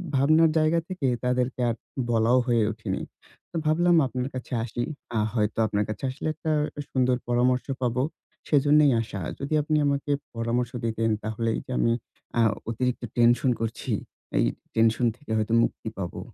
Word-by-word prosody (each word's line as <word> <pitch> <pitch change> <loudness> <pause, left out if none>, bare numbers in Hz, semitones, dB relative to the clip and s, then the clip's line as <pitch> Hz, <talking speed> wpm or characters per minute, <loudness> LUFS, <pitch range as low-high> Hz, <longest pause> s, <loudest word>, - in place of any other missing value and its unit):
ভাবনার 155 +4 +5
জায়গা 155 +2 +3
থেকে 185 -7 -1 0.2
তাদেরকে 125 0 0
আর 115 - -1 0.3
বলাও 115 +2 +3
হয়ে 120 -2 +3
ওঠেনি। - - -4 0.5
তো - - -12
ভাবলাম 175 +3 +4
আপনার 125 0 -3
কাছে 130 0 -6
আসি, 120 +1 -3 0.3
আ - - +3
হয়তো 105 -2 0
আপনার 105 -1 0
কাছে 105 +3 -5
আসলে 130 +4 -5
একটা 160 +1 -3 0.4
সুন্দর 130 -1 +2
পরামর্শ 125 +1 +2 0.2
পাবো। 125 0 +1 0.5
সেজন্যেই 145 0 +5
আসা। 105 -4 -5 0.2
যদি 140 +3 -3
আপনি 155 +1 +1
আমাকে 140 +1 0 0.2
পরামর্শ 115 +1 -1
দিতেন? 115 0 0
তাহলে 110 +1 -2
এইযে - - -8
আমি 115 - +3 0.5
আ - - +6 0.3
অতিরিক্ত 125 +2 -1
টেনশন 120 +2 +4
করছি, 115 0 -3 0.5
এই - - +4 0.3
টেনশন 115 +2 +3
থেকে 145 -4 -10
হয়তো 110 +1 0
মুক্তি - - -3
পাবো। 90 -2 -4
125 Hz, 155 wpm, -26 LUFS, 115-140 Hz, 0.5 s, আ